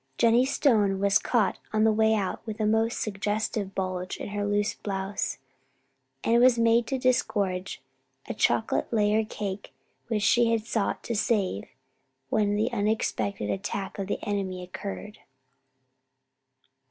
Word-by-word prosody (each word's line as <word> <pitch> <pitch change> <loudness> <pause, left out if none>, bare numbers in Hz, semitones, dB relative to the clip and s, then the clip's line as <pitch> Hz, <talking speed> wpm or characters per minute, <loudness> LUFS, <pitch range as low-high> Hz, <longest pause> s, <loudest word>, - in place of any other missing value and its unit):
Jennie 235 +2 +4
Stone 210 -9 +2
was 200 0 +4
caught 225 -6 +1
on 215 0 +2
the 220 - +5
way 220 +1 +3
out 195 -3 -2
with 220 -1 -6
a 215 - +1
most 220 +2 +1
suggestive 205 -1 -2
bulge 185 -1 -3
in - - -6
her 205 0 -2
loose 205 0 +1
blouse, 195 0 -3 0.9
and 235 +1 +4
was 250 -1 +6
made 230 0 +3
to 270 - -1
disgorge 200 -7 0 0.4
a - - -3
chocolate - - +1
layer 215 -1 +2
cake 205 -2 -5 0.4
which 220 -3 -1
she 235 +3 +4
had 220 -1 -1
sought 225 -3 -1
to 235 - -3
"save" 205 - 0 0.6
when 205 -1 +1
the 220 +4 0
unexpected 200 - -1
attack 195 0 -4
of 195 - -3
the - - -1
enemy 190 -3 -2
occurred. 200 +3 -7
210 Hz, 140 wpm, -27 LUFS, 195-225 Hz, 0.9 s, was